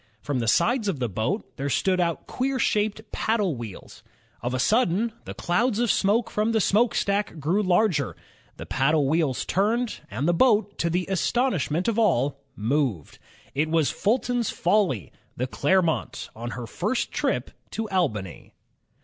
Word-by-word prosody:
From 140 +1 -2
the 115 - -2
sides 230 - +2
of 190 -7 0
the 125 -2 -1
boat, 110 - -3
there 140 +1 -2
stood 185 +6 +1
out 170 -2 0
queer 265 +1 -1
shaped 215 -2 0
paddle 210 -8 0
wheels. 115 -5 -9 0.4
Of 120 +2 -2
a - - 0
sudden, 220 - +2
the - - -7
clouds 210 +6 +1
of 235 -1 +2
smoke 215 +5 +1
from 215 +2 0
the 220 - +3
smokestack 205 -2 +1
grew 170 +8 +1
larger, 180 -6 +2 0.4
the - - -7
paddle 140 +2 +2
wheels 150 -3 +1
turned, 225 +5 0
and 130 +9 -2
the 175 - +4
boat, 210 0 +3
to 170 - +1
the 180 +2 0
astonishment 190 - 0
of 230 -1 +1
all, 140 - +2
moved. 120 - -1 0.3
It 150 +3 0
was 160 -3 +2
'^ - - -10
Fulton's 240 +1 0
Folly," 175 - +1 0.3
the 125 - 0
Clermont 170 +4 +1
j - - -7
on 120 +1 -5
her 125 - -5
first 205 - -2
trip - - -1 0.2
to 220 0 -3
Albany. 110 - -2
180 Hz, 165 wpm, -25 LUFS, 140-215 Hz, 0.4 s, the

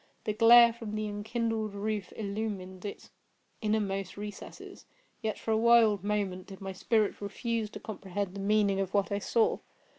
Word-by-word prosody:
The 215 - -1
glare 235 +2 +8
from 225 -2 -6
the 215 0 -2
enkindled 220 0 -2
roof 205 -1 -3
illumined 200 -3 -4
its 205 - -7 0.5
inmost 200 -4 -1
recesses. 205 -1 -9 0.3
Yet, 220 -2 -2
for 225 - -3
a 220 - +3
wild 225 -4 +5
moment, 200 -3 -2
did 195 -1 -10
my 195 -1 -5
spirit 215 +2 0
refuse 220 +2 -2
to - - -9
comprehend 195 -2 -5
the 200 - -7
meaning 200 -1 +2
of 195 0 -2
what 200 0 +1
I 200 - 0
saw. 225 +2 +1
210 Hz, 160 wpm, -30 LUFS, 195-220 Hz, 0.5 s, glare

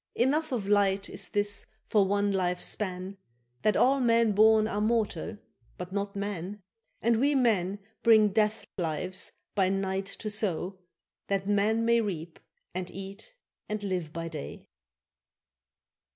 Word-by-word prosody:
—Enough 290 +6 +2
of 225 -6 -2
light 200 -1 +2
is 190 -2 -2
this 205 0 -1 0.2
for 205 -3 +3
one 205 +1 +1
life's 180 -2 0
span, 190 -1 -4 0.4
That 215 - +3
all 275 +2 +4
men 230 -3 +4
born 215 +1 +5
are 210 -1 -2
mortal, 220 -1 0 0.4
but 180 0 -6
not 200 0 -3
man: 200 0 -4 0.4
And 230 0 +4
we 285 +5 +3
men 205 -7 +2 0.2
bring 220 -2 +6
death 210 +1 +1
lives 180 +3 -2 0.2
by 190 -2 +2
night 195 0 -1
to 210 +2 -5
sow, 190 -3 -2 0.5
That 195 -1 -1
man 210 +3 +2
may 235 0 +4
reap 170 -6 -5 0.3
and 180 0 -4
eat 195 - -9 0.3
and 215 -1 -3
live 180 -5 -2
by 165 +1 -4
day. 155 -3 -7
205 Hz, 140 wpm, -29 LUFS, 190-220 Hz, 0.5 s, bring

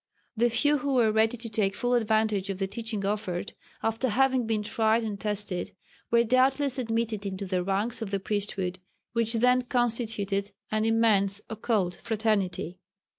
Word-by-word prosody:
The 240 +2 +3
few 290 +5 +2
who 280 -1 -1
were 230 -3 +4
ready 220 +2 +2
to 230 +1 -5
take 210 -3 0
full 245 0 0
advantage 215 -4 +1
of 195 - -2
the 195 - -1
teaching 215 0 -3
offered, 200 -3 -2 0.3
after 225 +3 0
having 260 +1 +2
been 215 -2 0
tried 220 +2 +2
and 210 -2 -4
tested, 205 -3 -1 0.3
were 235 0 +4
doubtless 260 +3 +2
admitted 225 -3 -1
into 195 0 -4
the 180 -1 -1
ranks 210 +5 0
of 220 - -3
the 200 0 -1
priesthood 195 -2 -2 0.3
which 230 -1 0
then 250 +2 +4
constituted 225 -5 -1 0.2
an 215 0 +1
immense 215 -3 +3
occult 210 -5 -1
fraternity. 200 -6 -1
220 Hz, 160 wpm, -27 LUFS, 200-235 Hz, 0.3 s, were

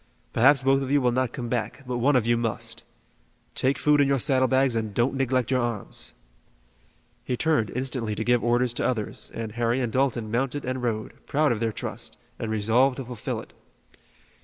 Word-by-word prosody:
Perhaps 135 +4 +5
both 135 +1 +3
of 135 - -3
you 145 +1 +4
will 125 -2 +2
not 130 0 0
come 120 - -5
back, 120 +2 -3
but 125 -1 -3
one 140 +4 +3
of 125 -3 +3
you 120 0 +3
must. 115 0 -3 0.7
Take 135 +1 +1
food 150 +2 +4
in 140 - +4
your 140 0 +2
saddle 130 0 +3
bags 130 -2 +2
and 110 -3 -2
don't 120 +3 +2
neglect 130 -2 0
your 130 -1 +2
arms." 120 -4 -4 1.1
He 125 - -2
turned 155 -9 +1
instantly 125 -4 -2
to 110 - -2
give 120 0 +2
orders 120 +1 +2
to - - -2
others 110 -5 -3
and 115 -1 -4
Harry 120 +2 0
and 120 -3 -2
Dalton 125 -5 0
mounted 135 +4 -1
and 130 0 -2
rode, 110 -3 -3
proud 150 0 +2
of 115 - -1
their 115 0 0
trust, - - -5 0.2
and 115 - -3
resolved 115 +5 +2
to 135 - -5
fulfill 120 -3 -4
it. - - -16
125 Hz, 200 wpm, -26 LUFS, 115-135 Hz, 1.1 s, Perhaps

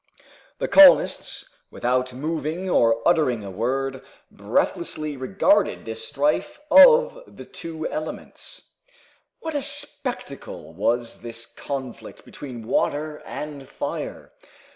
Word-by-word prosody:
The - - -2
colonists, 290 -2 +5
without 125 +1 -1
moving 155 +6 -3
or 115 -9 +2
uttering 140 -10 +2
a 100 - -7
word, 130 +6 -2 0.3
breathlessly 155 -1 -2
regarded 195 +9 +1
this 110 0 -5
strife 145 - -1
of - - +7
the - - -12
two 160 -1 -6
elements. 155 +1 -7 0.7
What 320 -1 -4
a 290 - -1
spectacle 255 - -4
was 115 +6 -1
this 115 -1 -7
conflict 135 -4 -7
between 125 -5 -9
water 150 +6 -1
and 145 -3 -7
fire! - - -5
145 Hz, 105 wpm, -23 LUFS, 120-170 Hz, 0.7 s, of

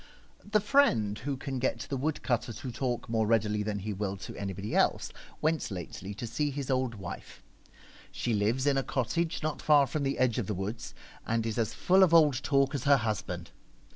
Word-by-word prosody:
t - - -21
he 215 - +5
friend 115 - +3
who 135 +2 -3
can 135 -1 -4
get 130 - -1
the 140 - -4
wood 145 +3 -2
cutter 120 -2 0
to 120 +4 -6
talk 125 0 -2
more 110 -2 +1
readily 105 -2 +2
than 105 0 -2
he 105 +2 -4
will 100 0 -3
to 95 - -8
anybody 100 +2 -4
else - - +2 0.3
went 160 +1 +1
lately 95 +1 -6
to 105 +4 -6
see 135 +6 -1
his 140 -1 -3
old 130 -3 0
wife. 95 -4 -9 0.7
She 120 - -2
lives 110 +6 +1
in 140 -1 +3
a - - -1
cottage 160 +8 -1
not 155 -1 -2
far 145 -2 +5
from 145 +3 -3
the 140 0 -1
edge 125 -2 +2
of 105 - -3
the 105 - -2
woods, 105 +5 -5 0.3
and 115 0 0
is 115 +1 -2
as 110 -1 -1
full 190 +2 +4
of 175 -3 +6
old 150 -5 +5
talk 140 0 +2
as 140 -2 -3
her 140 0 +6
husband. 110 -4 -3
120 Hz, 210 wpm, -30 LUFS, 105-140 Hz, 0.7 s, of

